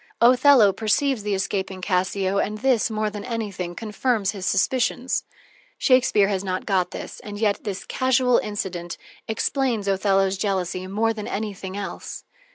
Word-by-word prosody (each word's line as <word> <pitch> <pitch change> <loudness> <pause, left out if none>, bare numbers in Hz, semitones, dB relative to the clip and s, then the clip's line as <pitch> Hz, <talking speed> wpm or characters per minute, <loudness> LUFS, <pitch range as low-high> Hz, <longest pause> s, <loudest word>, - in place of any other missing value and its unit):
Othello 245 -3 +6
perceives 225 +4 +1
the 205 -1 -1
escaping 190 0 -2
Cassio, 190 +1 0
and 210 +1 -1
this, 250 -1 +2
more 215 -1 -1
than 205 0 -6
anything, 205 -7 -4
confirms 215 -1 -1
his 190 -3 -5
suspicions. 245 +5 +1 0.5
Shakespeare 255 -6 +4
has 195 -2 -1
not 185 -1 -3
got 185 -3 +1
this, - - -8
and 205 -1 -8
yet 205 -1 0
this 195 -2 -4
casual 260 -1 +2
incident 185 -5 -4 0.3
explains 230 -1 -1
Othello's 195 0 +2
jealousy 185 -2 -1
more 220 +4 0
than 210 -2 -6
anything 200 -2 -4
else. 200 -1 -6
205 Hz, 145 wpm, -23 LUFS, 190-225 Hz, 0.5 s, Othello